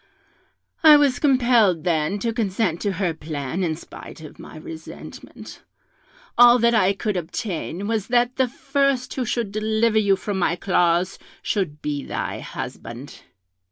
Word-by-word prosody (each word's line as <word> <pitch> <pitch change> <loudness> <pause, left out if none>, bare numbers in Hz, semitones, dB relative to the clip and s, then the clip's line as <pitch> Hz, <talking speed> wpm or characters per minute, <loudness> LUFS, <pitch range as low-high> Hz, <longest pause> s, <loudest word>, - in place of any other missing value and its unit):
I 305 -2 +9
was 280 -3 +2
compelled 240 - +3
then 170 +2 0
to 230 -1 -1
consent 205 -5 -1
to 200 -2 -1
her 180 -2 -1
plan, 155 +2 -4
in 160 -3 -1
spite 160 - -12
of 155 - -12
my - - -11
resentment; 160 +1 -11 0.8
all 240 0 +8
that 235 0 +3
I 200 -3 +3
could 210 +1 -3
obtain 180 +1 -4
was 220 -2 -1
that 245 +1 +1
the 260 -1 +2
first 275 0 -1
who 255 - -2
should 230 -3 -2
deliver 220 +1 +1
you 200 -2 +3
from 195 0 -4
my 170 -2 +1
claws 175 -1 +1 0.2
should 150 -7 -2
be 145 -2 -3
thy - - -4
husband. 120 +5 -8
200 Hz, 150 wpm, -22 LUFS, 165-240 Hz, 0.8 s, I